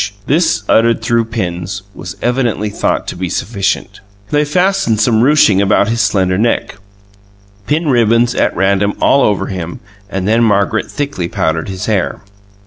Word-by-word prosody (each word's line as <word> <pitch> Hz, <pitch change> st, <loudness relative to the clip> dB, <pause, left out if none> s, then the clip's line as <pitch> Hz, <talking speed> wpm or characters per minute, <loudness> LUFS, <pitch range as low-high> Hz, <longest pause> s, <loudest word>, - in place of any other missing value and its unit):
This, 155 Hz, -, +1 dB
uttered 115 Hz, 0 st, +3 dB
through 115 Hz, 0 st, +1 dB
pins, 95 Hz, -3 st, -4 dB
was -, -, -9 dB
evidently 120 Hz, -4 st, 0 dB
thought -, -, -1 dB
to -, -, -6 dB
be 90 Hz, 0 st, -4 dB
sufficient. 100 Hz, +2 st, -2 dB, 0.3 s
They 150 Hz, 0 st, +2 dB
fastened 180 Hz, -, +1 dB
some 110 Hz, 0 st, +3 dB
ruching 125 Hz, -8 st, +4 dB
about 100 Hz, +1 st, +2 dB
his 115 Hz, +1 st, 0 dB
slender 95 Hz, -4 st, +1 dB
neck, 115 Hz, -3 st, -1 dB, 0.9 s
pinned 150 Hz, +2 st, 0 dB
ribbons 120 Hz, 0 st, +3 dB
at -, -, 0 dB
random 100 Hz, +2 st, +1 dB
all 140 Hz, -, +3 dB
over 105 Hz, -5 st, +1 dB
him, 90 Hz, -3 st, -6 dB, 0.3 s
and 95 Hz, -1 st, -3 dB
then 115 Hz, +2 st, +3 dB
Margaret 105 Hz, 0 st, +1 dB
thickly 140 Hz, -, -3 dB
powdered 80 Hz, +1 st, -2 dB
his 95 Hz, -1 st, -5 dB
hair. 105 Hz, -4 st, -1 dB
110 Hz, 150 wpm, -14 LUFS, 95-120 Hz, 0.9 s, ruching